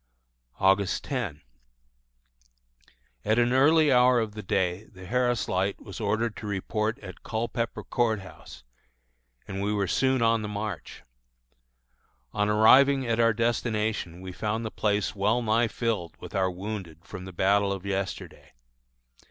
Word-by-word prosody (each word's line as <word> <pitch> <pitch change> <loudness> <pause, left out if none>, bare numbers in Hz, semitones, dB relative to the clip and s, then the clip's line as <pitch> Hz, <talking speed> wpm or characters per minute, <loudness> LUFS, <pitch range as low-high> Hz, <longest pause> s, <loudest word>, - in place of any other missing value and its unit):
August 95 -1 +2
10. 110 - -4 1.8
At 110 +2 +1
an 120 +1 +3
early 150 +3 +5
hour 125 -1 +5
of 110 -2 -2
the 105 0 -7
day 95 0 -1
the 95 -3 -14
Harris 120 +3 0
Light 95 +2 -1
was - - -9
ordered 110 +1 -1
to 105 - -7
report 105 +3 -2
at 95 -2 -10
Culpepper 115 +1 -3
Court 115 -4 0
House, 65 -8 -13 0.8
and 95 0 -4
we 100 +1 0
were 100 -2 0
soon 130 +6 +1
on 115 0 +3
the 105 - -4
march. 105 -3 -6 1.3
On 105 0 +1
arriving 130 +6 +5
at 115 -1 0
our 115 0 +5
destination 110 -5 -1
we 95 0 -7
found 110 +5 -3
the 110 - -4
place 105 -1 0
well 105 +5 +1
nigh 115 +2 +2
filled 110 -7 -3
with - - -10
our 95 -1 +1
wounded 90 -3 -7
from 95 -2 -8
the 95 - -8
battle 100 +3 +2
of 100 -1 -5
yesterday. 100 -1 -5
105 Hz, 145 wpm, -27 LUFS, 95-115 Hz, 1.8 s, early